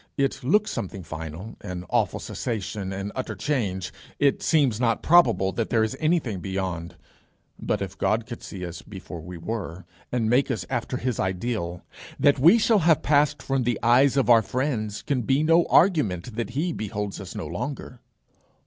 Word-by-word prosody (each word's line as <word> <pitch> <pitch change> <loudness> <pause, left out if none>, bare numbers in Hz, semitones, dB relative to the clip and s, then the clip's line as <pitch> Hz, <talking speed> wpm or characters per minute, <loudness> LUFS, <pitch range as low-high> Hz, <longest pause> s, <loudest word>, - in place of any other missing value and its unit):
It 135 -1 0
looks 210 +11 +2
something 95 0 -5
final, 80 +6 -7
an 90 -3 -6
awful - - +1
cessation, 105 -4 -4
an 100 +1 -4
utter 130 - -4
change. 100 -11 -2 0.2
It 140 -1 +2
seems 140 -9 +2
not 115 -2 +1
probable 160 - +4
that 110 +4 -2
there 115 -2 +3
is 110 +4 -1
anything 155 - 0
beyond. 90 -2 -4 0.6
But - - -1
if - - -7
God 110 +4 +1
could 120 -1 -8
see 90 -3 -7
us 85 -1 -7
before 95 -4 -9
we 90 +2 -8
were, 90 -2 -5 0.3
and 120 -3 0
make 125 +5 +3
us 110 -9 -2
after 125 0 -2
his 125 -3 -2
ideal, 95 -2 -2 0.4
that 140 -1 +4
we 170 - +7
shall 225 -1 +3
have 165 -3 +3
passed 145 -1 +2
from 135 -1 0
the 120 -2 0
eyes 130 +4 +4
of 135 - +2
our 115 -2 +7
friends 110 -3 -2
can 135 -3 0
be 135 +5 +1
no 165 +2 +4
argument 125 - +2
that 115 -1 -3
he 170 +3 0
beholds 105 -3 -4
us - - -9
no - - -4
longer. - - -5
115 Hz, 175 wpm, -25 LUFS, 95-140 Hz, 0.6 s, we